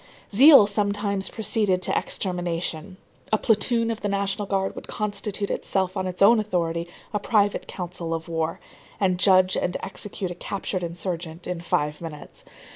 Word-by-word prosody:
Zeal 270 +1 +9
sometimes 200 -1 0
proceeded 205 -4 +1
to - - 0
extermination. 175 -1 -2 0.3
A 215 - +4
platoon 230 +2 +2
of 225 - -5
the 205 - -1
National 200 +1 -1
Guard 195 -1 0
would - - -9
constitute 205 -1 -2
itself 190 -1 -1
on 190 -1 -2
its 185 +1 0
own 225 +3 +7
authority 170 -5 -1 0.3
a 210 - +1
private 205 -1 +1
council 175 -2 -5
of 165 0 -3
war, 165 -1 -2 0.4
and 185 -3 +1
judge 185 -1 +4
and 180 - -1
execute 190 -1 -5
a - - -3
captured 185 +1 -4
insurgent 170 -1 -5
in 180 -2 -4
five 150 -2 -1
minutes. 155 -3 -9
190 Hz, 155 wpm, -24 LUFS, 175-205 Hz, 0.4 s, Zeal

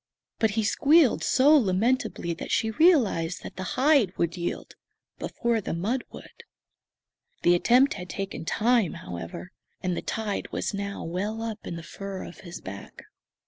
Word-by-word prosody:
But 220 - +3
he 220 - +2
squealed 290 +5 +4
so 280 +4 +5
lamentably 220 - +1
that 165 - -7
she 220 -1 +1
realized 220 - +3
that - - -8
the 185 - -6 0.2
hide 265 -8 +3
would 170 0 0
yield 175 -1 -4 0.5
before 235 -2 -1
the 185 - -3
mud 225 +9 -1
would. - - -13 1.0
The 175 - +5
attempt 250 +10 +4
had 180 -2 -8
taken 195 -2 -5
time, 225 +1 +2
however; 85 0 -7 0.3
and 180 -1 0
the - - -3
tide 215 -2 -3
was - - -2
now 200 0 -4
well 205 +7 -3
up 220 -2 -6
in 170 - -4
the 165 - -7
fur 195 +2 -7
of - - -10
his 175 -2 -9
back. 100 +1 -9
200 Hz, 160 wpm, -26 LUFS, 175-240 Hz, 1.0 s, so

